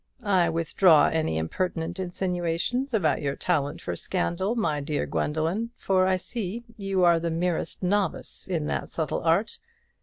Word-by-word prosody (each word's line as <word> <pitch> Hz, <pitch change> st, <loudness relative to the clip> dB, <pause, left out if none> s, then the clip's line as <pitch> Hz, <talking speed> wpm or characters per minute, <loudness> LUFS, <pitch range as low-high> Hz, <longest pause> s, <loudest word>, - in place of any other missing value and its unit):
I 185 Hz, -4 st, +3 dB
withdraw 165 Hz, 0 st, +4 dB
any 155 Hz, -, 0 dB
impertinent 165 Hz, -, -2 dB
insinuations 180 Hz, +7 st, -1 dB
about 180 Hz, -, +1 dB
your 140 Hz, -1 st, -1 dB
talent 145 Hz, -5 st, -1 dB
for 90 Hz, -, -3 dB
scandal, 185 Hz, -, -1 dB
my 155 Hz, -11 st, 0 dB
dear 145 Hz, +1 st, -1 dB
Gwendoline; 165 Hz, +9 st, -1 dB
for 185 Hz, -1 st, +2 dB
I 190 Hz, -, +3 dB
see 220 Hz, +3 st, -4 dB
you 195 Hz, -3 st, 0 dB
are 170 Hz, -1 st, +5 dB
the 170 Hz, 0 st, -2 dB
merest 170 Hz, +2 st, -1 dB
novice 200 Hz, +2 st, -1 dB
in 165 Hz, -5 st, -1 dB
that -, -, -2 dB
subtle 160 Hz, -2 st, -2 dB
art. 170 Hz, +7 st, +1 dB
175 Hz, 150 wpm, -26 LUFS, 160-190 Hz, -, are